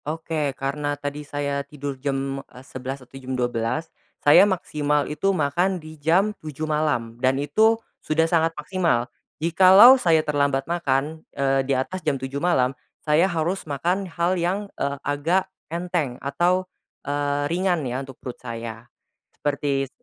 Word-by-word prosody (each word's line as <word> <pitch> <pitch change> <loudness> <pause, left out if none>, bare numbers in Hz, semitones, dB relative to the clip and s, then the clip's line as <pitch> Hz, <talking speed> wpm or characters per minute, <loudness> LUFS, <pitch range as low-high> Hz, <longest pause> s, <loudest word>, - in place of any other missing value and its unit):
Oke 155 -2 -2
karena 145 +1 -2
tadi 145 +1 -5
saya 145 -1 -2
tidur 145 0 -6
jam, 135 -1 -2
eee, 125 +1 -14
11.00 130 0 -6
atau 125 - -37
jam 130 0 -4
12.00, 120 +5 -1 0.4
saya 150 +8 +8
maksimal 150 -5 0
itu 150 +6 -1
makan 180 +2 +1
di 155 -2 -10
jam 185 +8 +3
7.00 155 0 -5
malam 145 -7 -1
dan 130 0 +3
itu 220 +11 +3 0.2
sudah 160 +1 +1
sangat 165 -1 +2
maksimal, 150 -6 0 0.3
jikalau 190 +10 +7
saya 160 -3 +3
terlambat 140 -2 +1
makan, 155 -2 -1 0.2
eee, 135 0 +2
di 135 - +3
atas 180 +8 -3
jam 150 -4 0
7.00 135 +2 -5
malam, 135 -7 +2 0.3
saya 160 +5 +4
harus 170 +3 -1
makan 180 +7 -1
hal 170 +2 0
yang, 190 +4 0
eee, 140 0 -2
agak 160 +6 +1 0.2
enteng 170 -6 -2
atau, 175 +7 +1 0.4
eee, 145 0 -1
ringan 175 0 0
ya 125 +1 -2
untuk 135 -2 -10
perut 125 - -8
saya, 115 0 -7 0.5
seperti 140 -1 -1
s - - -16
145 Hz, 155 wpm, -24 LUFS, 135-170 Hz, 0.5 s, saya